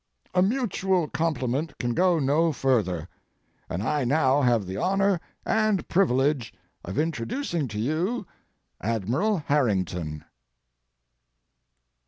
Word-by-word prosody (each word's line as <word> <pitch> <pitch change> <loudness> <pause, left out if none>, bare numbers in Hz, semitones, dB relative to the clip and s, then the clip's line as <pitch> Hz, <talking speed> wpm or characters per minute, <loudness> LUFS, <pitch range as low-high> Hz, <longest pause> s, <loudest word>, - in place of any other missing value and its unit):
A 180 - +4
mutual 190 - +1
compliment 150 -2 -1
can 120 -1 -1
go 180 +4 +3
no 155 +3 +2
further, 105 - 0 0.6
and 90 +4 -3
I 150 +4 0
now 135 +1 +3
have 120 -6 +2
the 95 +1 -5
honor 195 - +2 0.3
and 215 -4 +1
privilege 140 - +2 0.3
of 95 - -6
introducing 160 - -1
to 105 -2 -5
you 170 - -1 0.6
Admiral 115 - 0
Harrington. 95 - 0
145 Hz, 105 wpm, -26 LUFS, 115-180 Hz, 0.6 s, A